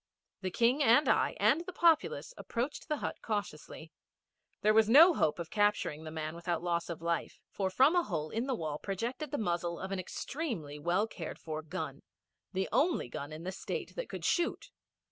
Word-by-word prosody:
The 190 - -2
King 240 +9 +2
and 245 +3 +5
I - - +3
and 325 - +4
the 360 +2 -7
Populace 335 +8 +2
approached 250 +5 -4
the 305 -2 0
hut - - -4
cautiously. 165 -6 -5 0.7
There 215 +1 +4
was 220 0 +5
no 325 +9 +9
hope 155 - +1
of 170 -2 -6
capturing 205 -7 +1
the - - -5
man 155 0 -4
without 170 0 -3
loss 170 -1 -1
of 165 -1 -6
life, 170 -1 -2
for 195 -2 -1
from 265 - +4
a 350 - +5
hole 155 - -3
in 230 +4 -2
the 265 - 0
wall 155 -6 -4
projected 235 - -3
the 290 - -2
muzzle 175 -4 -1
of 190 - -5
an 195 - -2
extremely 185 - -4
well 175 +7 +1
cared 175 -7 -7
for 155 -1 -5
gun 155 - -5 0.5
the 190 0 -1
only 310 - +2
gun 145 +4 -6
in 155 +2 -7
the 185 - -3
State 190 - -5
that - - -4
could - - -6
shoot. 345 -1 0
190 Hz, 195 wpm, -32 LUFS, 165-260 Hz, 0.7 s, no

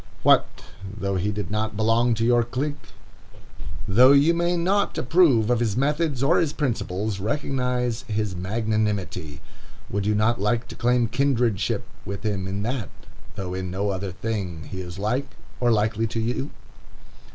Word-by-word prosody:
What - - +5 0.5
though 100 -2 -2
he 100 +4 0
did 105 -3 -4
not 110 0 -2
belong 115 +2 +3
to 115 +1 0
your 120 0 +4
clique! 140 +5 -4 1.0
Though 125 +7 +7
you 145 +4 +5
may 175 +1 +1
not 195 +4 +1
approve 130 -7 +4
of 120 - +2
his 115 -3 0
method 145 0 0
or 135 - +4
his 160 -4 0
principles, 105 -6 -2
recognize 125 0 -1
his 105 -3 -2
magnanimity. 100 -6 -2 0.5
Would 100 0 -1
you 105 - +2
not 110 +1 +1
like 115 +3 0
to - - -8
claim 120 0 +2
kindredship 120 -4 +1 0.2
with 100 0 -6
him 100 -3 -1
in 100 +1 -3
that, 120 -1 -3 0.5
though 95 -3 -4
in 95 0 -3
no 100 +3 -1
other 95 0 -3
thing 95 -5 -4
he 95 -2 -4
is 90 0 -8
like, 125 +7 -2 0.2
or 120 -1 +3
likely, 110 +1 +1
to 115 +1 -3
you? 120 +5 -2
110 Hz, 160 wpm, -24 LUFS, 100-125 Hz, 1.0 s, Though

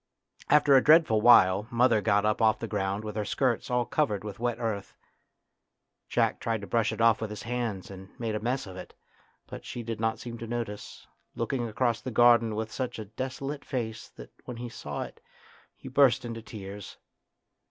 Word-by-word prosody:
After 145 -1 +5
a 130 - +6
dreadful 155 -9 +5
while 105 -3 +6
mother 120 -2 +3
got 100 0 +2
up 105 +2 +1
off 110 -1 +4
the - - -5
ground 100 0 -2
with 105 -1 -6
her 105 - -1
skirt 130 +4 0
all 125 -1 +1
covered 110 -11 0
with 105 -1 -7
wet 120 -1 -1
earth. 110 -4 -4 1.1
Jack - - +1
tried 115 -2 -2
to - - -6
brush 110 +4 +1
it - - -6
off 115 -1 +4
with 110 - -3
his 105 - -7
hands 115 -6 -3
and 95 0 -10
made 115 -2 -2
a 105 - -1
mess 125 +5 -2
of 95 -2 -10
it, 90 - -10 0.5
but - - -9
she 120 - -6
did 115 -1 -5
not 110 0 0
seem 120 -1 -8
to 115 - -6
notice, 115 -3 -5 0.3
looking 120 +1 -2
across 115 +1 0
the - - -5
garden 120 -2 +4
with 110 0 -3
such 125 -2 -4
a 110 - -6
desolate 135 +6 -5
face 110 -4 -4
that - - -12
when 125 - -7
he 120 0 -6
saw - - -5
it - - -12 0.5
he - - -12
burst 130 -3 +3
into 115 -1 -6
tears. 105 -2 -9
115 Hz, 195 wpm, -28 LUFS, 105-120 Hz, 1.1 s, a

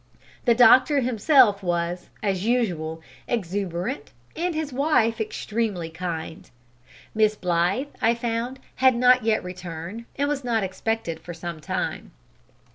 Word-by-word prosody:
The 235 -2 +5
doctor 260 +4 +6
himself 245 -3 +4
was, 175 0 -2
as 195 -3 0
usual, 175 -9 -1 0.2
exuberant, 185 -7 -3 0.2
and 345 0 -1
his 310 -3 -3
wife 245 -5 +2
extremely 210 -6 -3
kind. 160 -1 -6 0.6
Miss 215 -1 +3
Blythe, 180 +9 0
I 230 +1 +3
found, 235 +2 -3 0.2
had 260 -1 +5
not 250 0 +5
yet 220 -1 +1
returned, 180 +4 -7
and 285 0 0
was 290 -2 -2
not 230 -4 0
expected 190 -3 -3
for 175 +1 -9
some 170 -1 -6
time. 150 - -4
215 Hz, 125 wpm, -24 LUFS, 175-245 Hz, 0.6 s, doctor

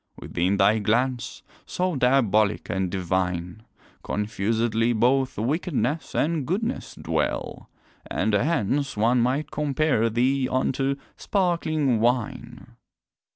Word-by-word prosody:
Within 90 +4 -1
thy 110 +2 +4
glance, 125 +4 -1 0.2
so 180 -2 -2
diabolic 115 -6 +2
and 95 0 -1
divine, 90 0 -2 0.4
Confusedly 110 +3 0
both 130 +3 +2
wickedness 145 +3 -1
and 155 -3 0
goodness 225 +9 -2
dwell, - - -3 0.4
And 110 +2 0
hence 140 +2 0
one 120 +3 +3
might 130 +6 0
compare 145 -5 +1
thee 130 +3 +1
unto 135 +1 0 0.2
sparkling 155 - 0
wine. 120 0 -2
125 Hz, 100 wpm, -25 LUFS, 110-140 Hz, 0.4 s, thy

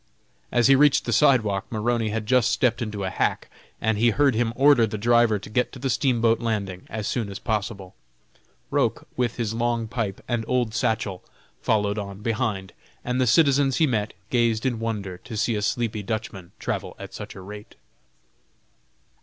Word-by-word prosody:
As 120 -1 +3
he 135 - +7
reached 145 +1 +4
the 120 - -1
sidewalk, 110 -6 +3
Maroney 115 0 0
had 110 0 -3
just 125 0 +3
stepped 125 -1 +1
into 105 -3 -3
a 95 - -2
hack, - - -1 0.3
and 110 -1 0
he 120 +1 +5
heard 140 +3 +3
him 115 +1 0
order 135 -3 +5
the 110 - -4
driver 120 0 +3
to 100 - -10
get 125 +4 0
to - - -8
the 130 +1 -1
steamboat 115 -1 +2
landing 100 -6 -3
as 110 -1 -4
soon 115 -5 -2
as 100 - -6
possible. 105 -3 -3 0.8
Roch, - - 0
with 120 -2 -1
his 115 -3 -2
long 115 0 -1
pipe 110 -4 -3
and 120 -2 -1
old 125 -3 0
satchel, 110 -5 -1 0.4
followed 105 -1 +1
on 100 0 -7
behind, 105 -4 -2 0.3
and 125 +1 0
the 125 - +2
citizens 140 -1 +4
he 160 - +4
met 110 -6 -1 0.2
gazed 115 -1 +1
in 120 -4 0
wonder 100 -5 -4
to 110 - -8
see 115 +2 +1
a 105 - -1
sleepy 110 0 -1
Dutchman 100 -4 -5
travel - - -4
at - - -9
such - - -8
a 95 - -9
rate. 105 +2 -10
115 Hz, 180 wpm, -24 LUFS, 105-120 Hz, 0.8 s, he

